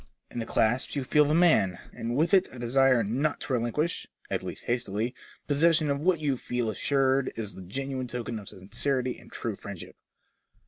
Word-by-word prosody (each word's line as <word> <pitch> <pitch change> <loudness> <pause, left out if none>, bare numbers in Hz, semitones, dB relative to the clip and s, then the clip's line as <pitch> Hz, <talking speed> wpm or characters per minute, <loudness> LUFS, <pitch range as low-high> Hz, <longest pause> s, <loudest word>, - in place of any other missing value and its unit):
In - - -4
the 115 - -4
clasp 120 +7 +1
you 140 - -1
feel 150 +3 +4
the 150 +2 +2
man, 155 - +4 0.2
and 115 +1 -3
with 160 +7 +2
it 190 - +5
a - - -10
desire 125 0 +3
not 130 +9 0
to 135 - -3
relinquish 125 +8 -1 0.2
(at - - 0
least - - -7
hastily) 120 -1 -1 0.3
possession 155 +1 +4
of 140 0 -1
what 180 +1 +3
you 145 -4 0
feel 120 -2 -2
assured 135 +2 +2
is 110 -3 -3
the - - -8
genuine 130 +7 -4
token 120 -2 -4
of 100 - -10
sincerity 125 +7 -1
and - - -16
true 115 -3 -3
friendship." 100 -4 -9
130 Hz, 185 wpm, -28 LUFS, 115-145 Hz, 0.3 s, it